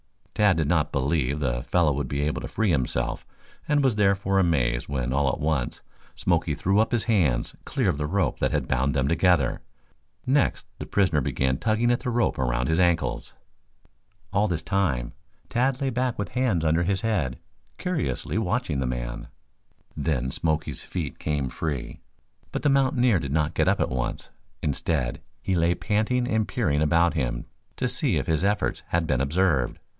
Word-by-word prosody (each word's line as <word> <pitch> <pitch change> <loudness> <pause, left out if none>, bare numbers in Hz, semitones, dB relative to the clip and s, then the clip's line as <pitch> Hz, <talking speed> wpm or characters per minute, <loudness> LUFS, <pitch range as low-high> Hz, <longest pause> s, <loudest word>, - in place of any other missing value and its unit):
Tad 105 -4 +3
did 80 -3 +1
not 80 -2 +1
believe 70 0 0
the - - -1
fellow 85 +2 +2
would 70 0 -2
be 70 +3 -2
able 75 +1 -1
to - - -5
free 110 -4 0
himself 60 -4 -1 0.4
and 150 -1 +2
was 130 -5 +3
therefore 95 -1 +2
amazed 65 -10 +1
when 65 -2 -1
all 70 0 +2
at - - -5
once 75 -5 -1 0.3
Smoke - - +1
threw 95 +3 +2
up 110 - +2
his 120 -3 +1
hands 80 - +1
clear - - 0
of 70 - 0
the 75 - -1
rope 100 +4 0
that - - +2
had - - -1
bound 70 +3 +1
them 65 -1 +1
together. 85 -3 +2 0.6
Next 135 +1 +1
the - - -6
prisoner 90 -7 +2
began 65 +1 0
tugging 115 - +1
at 120 - +2
the - - -3
rope 120 - +1
around - - 0
his 80 +4 +1
ankles. 85 -2 +1 1.0
All 100 +2 +3
this 85 -3 -2
time 80 -12 0 0.4
Tad 125 +2 +1
lay 135 -2 0
back 125 0 -1
with 100 -3 -3
hands 110 -10 0
under 80 +2 +3
his 95 +2 0
head, 90 - 0 0.4
curiously 180 - -2
watching 100 - -1
the 65 - -1
man. - - -4 0.7
Then 70 -4 -1
Smoky's 80 +1 -2
feet 80 -6 -5
came 70 -4 -1
free, 75 -2 -4 0.5
but - - -3
the 145 - +4
mountaineer 130 - +3
did 70 -4 -4
not 75 0 +1
get - - +1
up - - +3
at - - +1
once. 60 -2 -3 0.3
Instead, 70 -3 -1 0.2
he 95 - 0
lay 85 0 +2
panting 115 +5 0
and 110 -3 +1
peering 80 - 0
about 85 +2 +3
him - - -2 0.3
to - - -1
see - - 0
if - - -1
his 80 +1 0
efforts 105 +1 0
had 85 0 0
been 65 -4 +1
observed. 75 -3 +1
80 Hz, 180 wpm, -25 LUFS, 70-105 Hz, 1.0 s, the